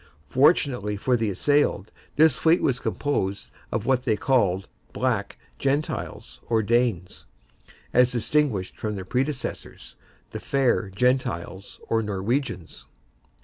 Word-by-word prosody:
Fortunately 125 Hz, -, +2 dB
for 125 Hz, +5 st, +1 dB
the 115 Hz, -3 st, 0 dB
assailed, 110 Hz, -1 st, +1 dB, 0.2 s
this 155 Hz, -3 st, +5 dB
fleet 165 Hz, +6 st, +3 dB
was 125 Hz, -2 st, +1 dB
composed 100 Hz, -12 st, -2 dB, 0.2 s
of 110 Hz, -1 st, -2 dB
what 130 Hz, -1 st, +2 dB
they 110 Hz, -5 st, +1 dB
called 100 Hz, -8 st, +1 dB, 0.3 s
Black -, -, -1 dB, 0.2 s
Gentiles, 140 Hz, +3 st, -3 dB
or 110 Hz, -2 st, +2 dB
Danes, 115 Hz, -5 st, 0 dB, 0.7 s
as 125 Hz, 0 st, +5 dB
distinguished 120 Hz, -5 st, 0 dB
from 105 Hz, -1 st, -3 dB
their 95 Hz, -2 st, -6 dB
predecessors, 130 Hz, +5 st, -4 dB, 0.4 s
the -, -, -5 dB
Fair 130 Hz, -6 st, +1 dB
Gentiles, 115 Hz, -4 st, -1 dB
or 115 Hz, 0 st, +1 dB
Norwegians. 105 Hz, -, -3 dB
120 Hz, 115 wpm, -25 LUFS, 100-135 Hz, 0.7 s, this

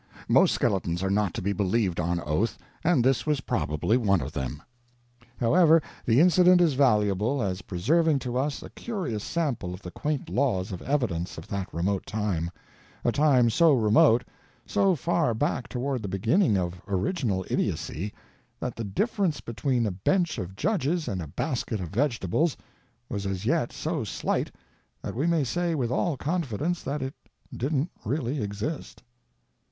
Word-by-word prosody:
Most -, -, +5 dB
skeletons 90 Hz, -3 st, 0 dB
are 95 Hz, -, 0 dB
not 100 Hz, -2 st, +2 dB
to -, -, -3 dB
be 100 Hz, +2 st, 0 dB
believed 100 Hz, -2 st, 0 dB
on 85 Hz, +1 st, 0 dB
oath, 75 Hz, +9 st, -1 dB, 0.3 s
and 160 Hz, -7 st, +3 dB
this 135 Hz, +3 st, +2 dB
was 150 Hz, -3 st, +1 dB
probably 75 Hz, -, 0 dB
one 100 Hz, -6 st, +2 dB
of 70 Hz, 0 st, -5 dB
them. 70 Hz, -1 st, -4 dB, 0.8 s
However, 165 Hz, +6 st, +5 dB, 0.3 s
the 115 Hz, +2 st, +5 dB
incident 180 Hz, +1 st, +6 dB
is 170 Hz, -4 st, +4 dB
valuable 110 Hz, -1 st, +2 dB
as 95 Hz, -1 st, -2 dB
preserving 150 Hz, -, +2 dB
to 125 Hz, -2 st, -4 dB
us 140 Hz, +3 st, -1 dB
a -, -, -10 dB
curious 170 Hz, -, -4 dB
sample 130 Hz, -, -2 dB
of 90 Hz, -, -14 dB
the 90 Hz, -, -7 dB
quaint 150 Hz, +5 st, -2 dB
laws 100 Hz, -1 st, 0 dB
of 90 Hz, -, -6 dB
evidence 110 Hz, -, -1 dB
of 80 Hz, -, -9 dB
that 100 Hz, -2 st, -3 dB
remote 95 Hz, +4 st, -1 dB
time 100 Hz, -6 st, -1 dB, 0.6 s
a -, -, +4 dB
time 130 Hz, -6 st, +4 dB
so 165 Hz, +4 st, +5 dB
remote, 115 Hz, 0 st, +5 dB, 0.4 s
so 195 Hz, -3 st, +2 dB
far 160 Hz, -4 st, +1 dB
back 125 Hz, 0 st, -1 dB
toward 130 Hz, 0 st, -2 dB
the 100 Hz, -, -4 dB
beginning 110 Hz, -, +2 dB
of 90 Hz, -1 st, -3 dB
original 100 Hz, -, -1 dB
idiocy, 95 Hz, +7 st, -2 dB, 0.5 s
that 125 Hz, -, -4 dB
the 115 Hz, -, -4 dB
difference 175 Hz, -, 0 dB
between 120 Hz, +1 st, -1 dB
a 105 Hz, -, 0 dB
bench 165 Hz, -, 0 dB
of 95 Hz, +1 st, -6 dB
judges 170 Hz, -, 0 dB
and 95 Hz, -2 st, -2 dB
a 80 Hz, -, -6 dB
basket 120 Hz, -, -2 dB
of 90 Hz, -3 st, -5 dB
vegetables 125 Hz, -, 0 dB, 0.5 s
was 100 Hz, -1 st, -3 dB
as 95 Hz, +1 st, -3 dB
yet 120 Hz, 0 st, +1 dB
so 160 Hz, -3 st, -2 dB
slight 105 Hz, -, -1 dB, 0.5 s
that -, -, -4 dB
we 140 Hz, +8 st, 0 dB
may 165 Hz, -3 st, +2 dB
say 170 Hz, +5 st, -1 dB
with 125 Hz, -5 st, -1 dB
all 150 Hz, +3 st, 0 dB
confidence 165 Hz, -, -1 dB
that 140 Hz, +1 st, -3 dB
it 135 Hz, +1 st, -4 dB, 0.4 s
didn't 145 Hz, +5 st, -1 dB
really 135 Hz, +3 st, -1 dB
exist. 105 Hz, +9 st, -5 dB
120 Hz, 165 wpm, -27 LUFS, 95-150 Hz, 0.8 s, incident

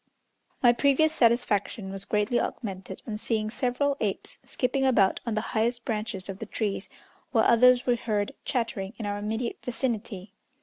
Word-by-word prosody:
My 240 Hz, -1 st, +7 dB
previous 280 Hz, +5 st, +3 dB
satisfaction 230 Hz, -6 st, +1 dB
was 195 Hz, 0 st, -3 dB
greatly 210 Hz, +3 st, +1 dB
augmented 190 Hz, -3 st, -5 dB
on 215 Hz, -2 st, -4 dB
seeing 215 Hz, -1 st, -1 dB
several 275 Hz, +4 st, 0 dB
apes 200 Hz, -3 st, -3 dB
skipping 265 Hz, +1 st, -1 dB
about 220 Hz, -8 st, +3 dB
on 225 Hz, -, 0 dB
the 215 Hz, -, +1 dB
highest 235 Hz, +2 st, 0 dB
branches 210 Hz, -4 st, -2 dB
of 195 Hz, -1 st, -6 dB
the 220 Hz, -, -6 dB
trees, 205 Hz, -2 st, -2 dB, 0.4 s
while 225 Hz, -4 st, +4 dB
others 250 Hz, +2 st, +6 dB
were 245 Hz, -, +3 dB
heard 210 Hz, -3 st, -1 dB
chattering 230 Hz, -5 st, -2 dB
in 220 Hz, -, -5 dB
our 205 Hz, 0 st, -2 dB
immediate 220 Hz, +3 st, -3 dB
vicinity. 225 Hz, -5 st, -3 dB
225 Hz, 160 wpm, -27 LUFS, 205-245 Hz, 0.4 s, My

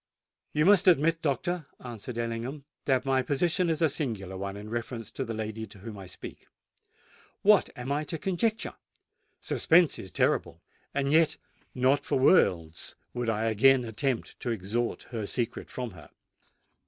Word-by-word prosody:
"You 150 Hz, +1 st, +2 dB
must 200 Hz, -1 st, +6 dB
admit, 165 Hz, -1 st, +4 dB
doctor," 160 Hz, +2 st, -1 dB
answered 120 Hz, -1 st, -7 dB
Ellingham, 120 Hz, +5 st, -3 dB, 0.2 s
"that 130 Hz, -1 st, +2 dB
my 135 Hz, -1 st, +3 dB
position 170 Hz, +6 st, +1 dB
is 160 Hz, 0 st, +1 dB
a -, -, +6 dB
singular 110 Hz, -, -2 dB
one 100 Hz, +1 st, -4 dB
in 105 Hz, +1 st, -8 dB
reference 115 Hz, -1 st, -4 dB
to -, -, -3 dB
the 115 Hz, -, -4 dB
lady 110 Hz, 0 st, -4 dB
of -, -, -14 dB
whom 105 Hz, +1 st, -9 dB
I 95 Hz, -, -9 dB
speak. -, -, -10 dB, 1.0 s
What 210 Hz, -1 st, +5 dB
am 125 Hz, +2 st, -5 dB
I 145 Hz, +2 st, 0 dB
to 165 Hz, -, -4 dB
conjecture? 210 Hz, +5 st, -1 dB, 0.7 s
Suspense 170 Hz, 0 st, +3 dB
is 95 Hz, -, -7 dB
terrible; -, -, 0 dB, 0.3 s
and 140 Hz, 0 st, 0 dB
yet, 160 Hz, 0 st, +4 dB, 0.4 s
not 135 Hz, +3 st, +3 dB
for -, -, 0 dB
worlds 85 Hz, -, +3 dB, 0.2 s
would 120 Hz, -1 st, -2 dB
I 110 Hz, 0 st, 0 dB
again 125 Hz, +4 st, +4 dB
attempt 115 Hz, +2 st, -2 dB
to 125 Hz, -, -3 dB
extort 115 Hz, +3 st, -2 dB
her 110 Hz, -4 st, -3 dB
secret 120 Hz, -1 st, -3 dB
from 125 Hz, -3 st, -5 dB
her." 85 Hz, -6 st, -14 dB
125 Hz, 160 wpm, -28 LUFS, 110-150 Hz, 1.0 s, must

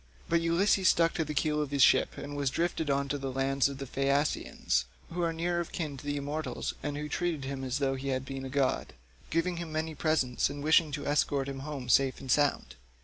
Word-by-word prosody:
But 170 Hz, 0 st, +2 dB
Ulysses 185 Hz, +3 st, +3 dB
stuck 165 Hz, 0 st, +4 dB
to 160 Hz, -, 0 dB
the 150 Hz, -1 st, -5 dB
keel 150 Hz, +1 st, +1 dB
of 150 Hz, -, -2 dB
the 140 Hz, -, -2 dB
ship 135 Hz, -, +4 dB
and 145 Hz, 0 st, -6 dB
was 140 Hz, -2 st, 0 dB
drifted 165 Hz, 0 st, -1 dB
on 140 Hz, 0 st, +1 dB
to 145 Hz, +1 st, -1 dB
the 135 Hz, -1 st, -3 dB
land 135 Hz, +1 st, +1 dB
of 140 Hz, -, -6 dB
the 135 Hz, -, -5 dB
Phaeacians, 140 Hz, -, 0 dB, 0.3 s
who 175 Hz, -, -2 dB
are 170 Hz, -1 st, +1 dB
near 170 Hz, +1 st, -1 dB
of 170 Hz, -, -4 dB
kin 155 Hz, -5 st, -3 dB
to 130 Hz, -, -11 dB
the 145 Hz, 0 st, -2 dB
immortals, 145 Hz, +2 st, -3 dB
and 145 Hz, -1 st, -3 dB
who 150 Hz, 0 st, -4 dB
treated 160 Hz, -2 st, -2 dB
him 135 Hz, 0 st, -4 dB
as 130 Hz, 0 st, -1 dB
though 135 Hz, -2 st, +1 dB
he 135 Hz, +1 st, -5 dB
had 130 Hz, -1 st, -1 dB
been 135 Hz, 0 st, -5 dB
a 135 Hz, -, -5 dB
god, 135 Hz, -1 st, 0 dB, 0.4 s
giving 170 Hz, +2 st, 0 dB
him 170 Hz, -2 st, -5 dB
many 160 Hz, +1 st, -2 dB
presents, 145 Hz, -6 st, +1 dB
and 145 Hz, 0 st, -6 dB
wishing 155 Hz, 0 st, +4 dB
to 145 Hz, -1 st, -4 dB
escort 145 Hz, -1 st, +1 dB
him 135 Hz, -1 st, -5 dB
home 140 Hz, -2 st, -6 dB
safe 130 Hz, +2 st, +3 dB
and 130 Hz, -, -4 dB
sound. 145 Hz, -, +2 dB
145 Hz, 235 wpm, -30 LUFS, 135-160 Hz, 0.4 s, stuck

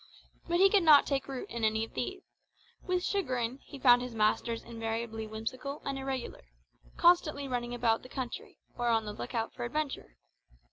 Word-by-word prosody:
But 345 Hz, -, +1 dB
he 385 Hz, +2 st, +7 dB
could 405 Hz, -, +5 dB
not 310 Hz, -4 st, +7 dB
take 275 Hz, -2 st, -1 dB
root 270 Hz, -2 st, -5 dB
in 235 Hz, -1 st, -4 dB
any 220 Hz, 0 st, +2 dB
of -, -, -19 dB
these; 125 Hz, -2 st, -4 dB, 0.6 s
with 365 Hz, -1 st, -1 dB
chagrin, 255 Hz, -, -1 dB
he 280 Hz, -, -11 dB
found 245 Hz, -2 st, +6 dB
his 250 Hz, -2 st, -6 dB
masters 225 Hz, +2 st, +1 dB
invariably 225 Hz, -1 st, -4 dB
whimsical 255 Hz, +7 st, -5 dB
and 275 Hz, -, -2 dB
irregular, 265 Hz, -2 st, -4 dB, 0.6 s
constantly 325 Hz, -5 st, +4 dB
running 245 Hz, -1 st, -2 dB
about 230 Hz, -2 st, +2 dB
the 255 Hz, -, -13 dB
country, 255 Hz, -3 st, -6 dB, 0.2 s
or 240 Hz, -1 st, -1 dB
on 225 Hz, -2 st, +2 dB
the 210 Hz, -, -5 dB
look 225 Hz, -, -6 dB
out 225 Hz, -1 st, -1 dB
for 245 Hz, -, -6 dB
adventure. 270 Hz, -, -3 dB
245 Hz, 180 wpm, -31 LUFS, 225-275 Hz, 0.6 s, he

